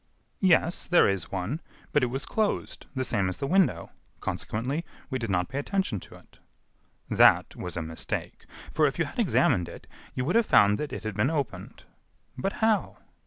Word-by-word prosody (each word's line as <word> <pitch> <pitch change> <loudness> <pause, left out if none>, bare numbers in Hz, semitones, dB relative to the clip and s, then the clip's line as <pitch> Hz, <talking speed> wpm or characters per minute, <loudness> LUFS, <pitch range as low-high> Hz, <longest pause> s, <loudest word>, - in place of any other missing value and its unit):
"Yes, 175 -2 +3
there 175 - +5
is 95 -4 -1
one, 100 - -3 0.3
but 150 - +3
it 125 - +2
was 135 +3 -3
closed, 215 -2 -2
the 130 - 0
same 100 -7 +1
as 95 - -4
the 140 - -3
window. 155 - +2 0.3
Consequently, 130 +9 -3 0.3
we 130 - -1
did 115 -2 -3
not 90 -2 +1
pay 135 - -4
attention 190 - -1
to - - -14
it." - - -20 0.7
"That - - +5
was 90 -1 -6
a 85 - -2
mistake; 80 0 -5 0.3
for, - - +4
if - - -3
you - - +1
had - - -8
examined 85 -1 +2
it, - - -11 0.3
you 125 - -1
would 175 - 0
have 230 -1 +4
found 105 0 +5
that 150 -1 -3
it - - -6
had 110 -1 -3
been 105 +7 +1
opened." 145 -5 -4 0.5
"But 195 - -2
how?" 220 -2 +1
130 Hz, 190 wpm, -27 LUFS, -, 0.7 s, there